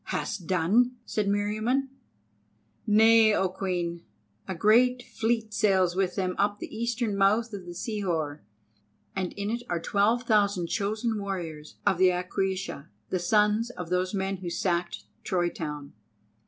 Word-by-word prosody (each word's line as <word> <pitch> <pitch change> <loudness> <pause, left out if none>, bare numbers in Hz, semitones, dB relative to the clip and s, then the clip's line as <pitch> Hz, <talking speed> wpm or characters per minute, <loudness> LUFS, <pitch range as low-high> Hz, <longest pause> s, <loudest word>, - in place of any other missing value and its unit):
"Hast 180 -5 -3
done?" 205 +8 +2
said 210 -2 -1
Meriamun. 215 +7 0 1.0
"Nay, 220 0 +6
O 190 - +2
Queen! 175 -2 -3 0.4
A 190 - -3
great 245 +7 +4
fleet 225 -2 -1
sails 190 -5 +2
with 185 -2 0
them 185 -2 -1
up 205 +1 +2
the - - -8
eastern 235 -1 -1
mouth 210 +4 +2
of 200 - -5
Sihor, 170 -8 -2 0.7
and 185 -2 -2
in 205 +1 -3
it 235 +1 -2
are 175 - 0
twelve 210 +7 +1
thousand 200 -6 +2
chosen 215 +1 -1
warriors 165 -6 -5
of 180 - +2
the 185 0 +6
Aquaiusha, 185 -3 -2 0.2
the 185 - +1
sons 210 +5 +2
of 180 -8 -8
those 180 0 +1
men 195 0 -1
who 180 -1 -5
sacked 170 0 -1 0.2
Troy 175 -2 0
town." 150 -4 -6
195 Hz, 140 wpm, -27 LUFS, 180-220 Hz, 1.0 s, Nay